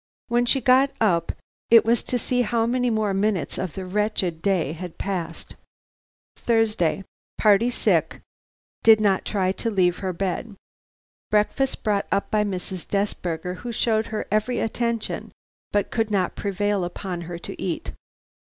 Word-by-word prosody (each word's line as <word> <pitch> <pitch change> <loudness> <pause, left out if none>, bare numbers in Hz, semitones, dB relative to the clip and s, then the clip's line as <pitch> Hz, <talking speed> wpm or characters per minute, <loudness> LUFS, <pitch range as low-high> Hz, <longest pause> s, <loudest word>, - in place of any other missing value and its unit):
When 240 +1 +2
she 270 +2 +3
got 260 +3 +5
up 180 -7 +2 0.4
it 230 -1 +7
was 230 0 +3
to 250 - -2
see 245 +1 +1
how 230 0 +1
many 250 +1 +1
more 215 -3 0
minutes 195 -3 0
of 185 -4 -4
the 190 - -5
wretched 190 -4 -1
day 185 -7 +1
had 175 0 -8
passed. 185 -4 -4 0.8
"Thursday. 215 -6 +1 0.3
"Party 215 +3 +4
sick; 245 - +1 0.6
did 220 -1 +7
not 200 -3 +2
try 190 -3 0
to 230 +4 -3
leave 180 -4 +2
her 190 -2 -2
bed. 195 +4 -3 0.7
Breakfast 215 +6 +1
brought 205 -2 0
up 200 - 0
by 215 -1 +3
Mrs. 185 -2 -5
Desberger, 180 -3 -2
who 240 +3 -6
showed 220 -1 +1
her 215 -1 -4
every 215 +4 +1
attention, 235 0 -2 0.4
but 205 -1 0
could 225 -2 0
not 195 -4 0
prevail 205 -1 -1
upon 175 0 -5
her 175 - -5
to 170 - -8
eat. 175 -3 -3
205 Hz, 155 wpm, -24 LUFS, 185-225 Hz, 0.8 s, it